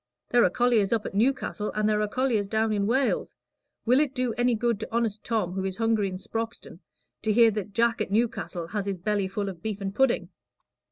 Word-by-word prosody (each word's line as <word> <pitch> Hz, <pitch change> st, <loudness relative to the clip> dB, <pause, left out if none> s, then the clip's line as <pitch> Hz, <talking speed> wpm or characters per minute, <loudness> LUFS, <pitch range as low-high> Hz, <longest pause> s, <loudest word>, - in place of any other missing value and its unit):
There 240 Hz, -1 st, +5 dB
are -, -, +4 dB
colliers 235 Hz, -1 st, +2 dB
up 225 Hz, -2 st, +1 dB
at -, -, -5 dB
Newcastle, 220 Hz, -1 st, 0 dB
and 215 Hz, 0 st, +1 dB
there 210 Hz, 0 st, +2 dB
are 210 Hz, -, +1 dB
colliers 230 Hz, -3 st, 0 dB
down 220 Hz, +1 st, +1 dB
in 200 Hz, -1 st, 0 dB
Wales. 260 Hz, +3 st, 0 dB, 0.5 s
Will 250 Hz, +3 st, +4 dB
it 285 Hz, -2 st, 0 dB
do 250 Hz, -2 st, 0 dB
any 245 Hz, 0 st, +2 dB
good 235 Hz, -1 st, 0 dB
to 220 Hz, -, -5 dB
honest 225 Hz, -2 st, -1 dB
Tom, 220 Hz, -6 st, -1 dB
who 190 Hz, +1 st, -3 dB
is 190 Hz, 0 st, -3 dB
hungry 225 Hz, -3 st, +1 dB
in 185 Hz, -, -5 dB
Sproxton, 225 Hz, +4 st, -5 dB, 0.4 s
to 220 Hz, -, 0 dB
hear 230 Hz, +1 st, +6 dB
that 210 Hz, -1 st, -5 dB
Jack 230 Hz, +2 st, +2 dB
at -, -, -1 dB
Newcastle 205 Hz, -5 st, -1 dB
has 205 Hz, 0 st, -3 dB
his 195 Hz, -1 st, -2 dB
belly 205 Hz, +1 st, 0 dB
full 200 Hz, +1 st, -3 dB
of 180 Hz, -4 st, -7 dB
beef 210 Hz, 0 st, -3 dB
and 195 Hz, -1 st, -4 dB
pudding?" 265 Hz, +2 st, +2 dB
220 Hz, 220 wpm, -26 LUFS, 200-235 Hz, 0.5 s, hear